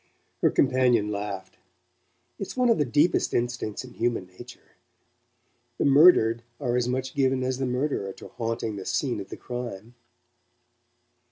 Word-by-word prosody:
Her - - +5
companion 125 -5 +2
laughed. 100 -2 -5 0.8
"It's 195 - -6
one 250 -1 +3
of 230 - +3
the 150 - +3
deepest 150 +7 +2
instincts 120 -3 -2
in 125 -1 -12
human 120 -5 -1
nature. 120 +7 -14 1.0
The - - 0
murdered 135 -6 +6 0.2
are 125 -4 -1
as 125 -1 +1
much 130 +1 -2
given 130 -2 +1
as 130 0 -2
the 135 - -1
murderer 125 -6 -1
to - - -12
haunting 115 -2 -3
the 95 - -7
scene 130 -7 -1
of 95 - -8
the - - -7
crime." 120 -3 -7
125 Hz, 150 wpm, -26 LUFS, 110-130 Hz, 1.0 s, murdered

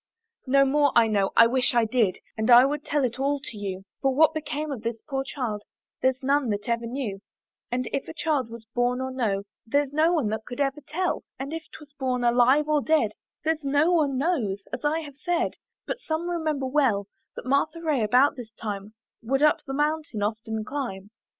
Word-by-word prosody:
No 275 +1 +5
more 285 +1 +3
I 235 - +7
know, 200 -3 +1
I 230 - +9
wish 250 +1 +1
I 235 -1 +4
did, 220 -5 +1 0.2
And 220 +2 -1
I 245 +1 +9
would 295 +1 -2
tell 290 -1 0
it 245 0 -1
all 280 +1 +1
to - - -7
you; 195 -2 -5 0.2
For 270 - +3
what 315 +2 +5
became 305 -1 -3
of 255 -6 -4
this 230 0 -3
poor 270 -2 -1
child 245 -6 -3 0.4
There's 260 0 +1
none 275 -1 +2
that 205 0 -2
ever 235 0 -1
knew: 235 -6 -4 0.5
And 250 0 -1
if 275 - -2
a - - -7
child 295 -8 0
was 230 -1 -10
born 245 +1 +1
or 260 0 -3
no, 215 -7 -1 0.2
There's 285 +3 +1
no 315 +3 +4
one 295 -11 +1
that 220 +1 -3
could 245 - -7
ever 280 +1 0
tell; 365 +3 -1
And 275 +3 -5
if 325 -1 -6
'twas 290 -2 -13
born 255 -2 0
alive 250 +5 +4
or 305 -1 +2
dead, 300 -8 +2 0.3
There's 315 -1 0
no 290 +5 +3
one 295 -6 +2
knows, 250 - 0
as - - -4
I 310 +2 +1
have 285 -3 -10
said, 350 +2 0 0.3
But - - -4
some 320 -1 -2
remember 310 -5 -1
well, 255 -7 +2 0.3
That - - -8
Martha 280 +5 +1
Ray 310 -6 0
about 250 +7 +4
this 245 -4 -8
time 210 -1 -6 0.3
Would 270 +5 0
up 300 - +4
the 270 - -4
mountain 295 -7 -1
often 220 +1 -3
climb. 210 -7 -5
265 Hz, 210 wpm, -26 LUFS, 230-295 Hz, 0.5 s, I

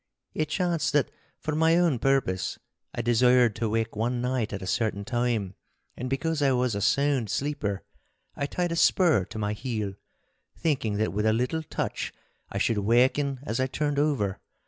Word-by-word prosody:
It 155 -1 -1
chanced 170 -2 0
that 145 -2 +2 0.3
for 155 - -3
my 160 +2 +4
own 170 -8 +2
purpose 120 -9 +1 0.3
I 120 - -4
desired 120 -1 +4
to 115 -2 -1
wake 115 +1 -1
one 120 +3 -1
night 125 -2 -1
at 100 -1 -5
a - - -4
certain 100 0 -1
time, 120 -4 -1 0.4
and 125 - -4
because 155 +3 -1
I 135 -2 +4
was 125 -2 +1
a 100 - -2
sound 135 +1 +2
sleeper, 130 -9 -2 0.5
I 140 - -2
tied 175 +3 -1
a - - -1
spur 165 - +4
to - - -9
my 105 -1 -1
heel, 105 -4 -3 0.6
thinking 130 -10 0
that 110 +1 0
with 105 +2 +1
a 110 - +4
little 125 +8 0
touch 155 - -3 0.4
I - - -4
should 110 -3 +1
waken 130 +5 +2
as 115 -3 -2
I 130 - +2
turned 145 +1 -1
over. 135 -10 0
125 Hz, 180 wpm, -27 LUFS, 110-145 Hz, 0.6 s, my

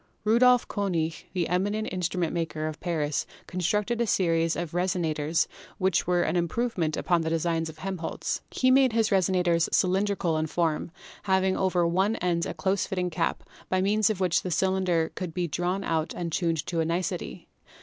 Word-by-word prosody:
Rudolf 245 +3 +4
Konig, 170 -6 -2
the 180 -3 0
eminent 205 +5 0
instrument 180 -2 -1
maker 160 -2 -2
of 155 -1 -4
Paris, 150 -5 -1 0.2
constructed 210 +6 -1
a 235 - +1
series 165 -4 +2
of 170 -2 -4
resonators 170 -3 0 0.3
which 190 -5 +1
were 175 -1 +3
an - - -1
im 175 -1 +1
provement 180 -6 -1
upon 175 -2 +1
the 160 - -1
design 165 0 0
of 160 - -11
Helmholtz. 185 -1 -3
He 255 0 +2
made 260 -2 +5
his 225 -1 +2
Manometric - - +3
Mirror. 190 - +5 0.4
resonators 170 - +1
cylindrical 190 -3 +1
in 155 - -1
form, 165 0 -1 0.4
having 190 -1 +2
over 180 -2 +1
one 190 +6 +2
end 170 -3 0
a - - -5
close 190 +4 0
fitting 180 -2 -2
cap, 165 +1 -1 0.3
by 185 - +1
means 205 +3 +2
of 215 -4 -2
which 180 -3 +2
the 185 - -4
cylinder 180 -2 +1
could 175 -3 -5
be 180 -1 0
drawn 180 +5 -1
out 160 -1 -1
and 170 -2 -3
tuned 165 -2 0
to 170 - -2
a - - +3
nicety. 170 +2 -3
180 Hz, 185 wpm, -27 LUFS, 165-190 Hz, 0.4 s, made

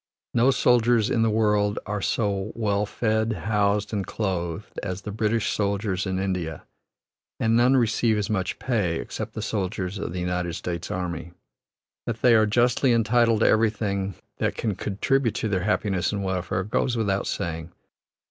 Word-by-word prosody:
No 120 +2 +4
soldiers 120 -2 +3
in 115 - +2
the 115 - +3
world 105 -1 +2
are 105 -1 -3
so 100 0 -1
well 105 -2 0
fed, 110 0 0
housed, 105 -1 0
and 100 -2 0
clothed 95 -2 -3
as 95 -1 -4
the 105 - -5
British 110 +1 0
soldiers 100 -2 -1
in 95 0 -1
India, 90 -5 -2 0.8
and 115 0 +2
none 125 +3 +5
receive 115 -2 +2
as 105 -1 -1
much 95 -4 -1
pay, 105 -10 0
except 110 0 -5
the 110 - -4
soldiers 100 -2 -2
of 100 - -4
the 90 - -4
United 90 -1 -2
States 85 -1 -4
army. 85 -2 -4 0.7
That 115 -1 -4
they 125 - +7
are 110 -1 +5
justly 120 +3 +3
entitled 115 0 +3
to - - +5
everything 105 -3 +1 0.2
that - - -1
can 110 -3 -1
contribute 110 +6 0
to - - -1
their 95 -3 -1
happiness 100 -3 0
and 100 -1 -2
welfare, 95 -1 -1
goes 115 +4 0
without 100 -3 0
saying. 80 0 -3
105 Hz, 165 wpm, -25 LUFS, 95-115 Hz, 0.8 s, they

